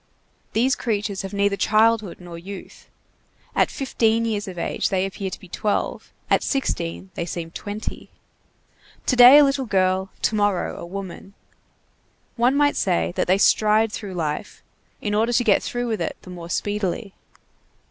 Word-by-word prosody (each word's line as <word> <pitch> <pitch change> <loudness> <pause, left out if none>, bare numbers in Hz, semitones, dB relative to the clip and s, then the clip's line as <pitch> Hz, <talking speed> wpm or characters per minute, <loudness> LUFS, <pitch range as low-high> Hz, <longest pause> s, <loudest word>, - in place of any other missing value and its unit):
These 255 +4 +2
creatures 205 -4 -2
have 195 -1 -6
neither 200 0 +1
childhood 215 -1 +2
nor 175 -1 -10
youth. 190 +3 -10 0.7
At - - +3
fifteen 230 -4 +1
years 210 -3 -2
of 185 -2 -7
age - - -1
they 190 -1 +1
appear 195 0 -4
to 185 - -8
be 185 - -14
twelve, 205 +4 -2 0.2
at - - +3
sixteen 190 - -2
they 170 - -4
seem 165 -1 -5
twenty. 205 +4 -6 1.0
To 255 - +2
day 250 +3 +10
a 295 - +8
little 275 -2 +1
girl, 190 -1 +1
to - - +2
morrow 205 -3 0
a - - -7
woman. 195 +1 -8 1.0
One 245 +3 +3
might 290 0 +3
say 175 -2 +1
that - - 0
they 185 +2 +4
stride 215 +1 +3
through 200 -4 -6
life, 160 +3 -4 0.4
in 205 - -2
order 225 +3 +2
to 245 - +3
get 215 -4 +4
through 245 0 -3
with 220 -2 -2
it - - -3
the 185 - -10
more 170 -1 -8
speedily. 205 +1 -2
205 Hz, 165 wpm, -23 LUFS, 185-225 Hz, 1.0 s, day